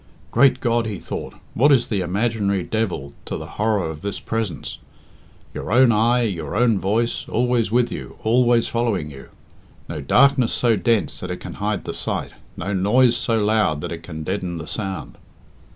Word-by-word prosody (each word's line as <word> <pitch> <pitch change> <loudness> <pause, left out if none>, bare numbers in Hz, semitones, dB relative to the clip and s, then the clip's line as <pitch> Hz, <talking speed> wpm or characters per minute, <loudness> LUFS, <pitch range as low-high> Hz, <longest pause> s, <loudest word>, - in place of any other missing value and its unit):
"Great 130 +1 +4
God!" 115 -2 +1
he 105 -3 -4
thought, - - -6 0.2
"what 145 +6 +4
is 130 -4 +4
the 100 -4 -1
imaginary 100 +1 0
devil 90 -12 -2
to - - -4
the - - -7 0.2
horror 105 -5 +1
of 80 -1 -7
this 100 -1 -4
presence? 110 -5 -4 0.7
Your - - -5
own 125 +1 +6
eye, 120 +3 +3
your 85 -9 -3
own 115 -3 +3
voice, 110 +5 -1
always 120 -3 +1
with 120 0 +2
you, - - -7
always 120 +1 +3
following 110 -10 -1
you! 70 -1 -12 0.6
No 75 -3 -5
darkness 130 - +4
so 120 -2 +3
dense 115 -1 0
that 90 - -6
it 90 - -3
can - - -8
hide 105 -1 -1
the - - -4
sight, - - -3 0.3
no 100 - -3
noise 115 +6 +4
so 115 -2 0
loud 105 -8 +2
that 85 - -5
it 85 -1 -5
can 80 -2 -7
deaden 90 0 -3
the 80 - -6
sound!" 95 +1 -5
110 Hz, 180 wpm, -22 LUFS, 95-120 Hz, 0.7 s, own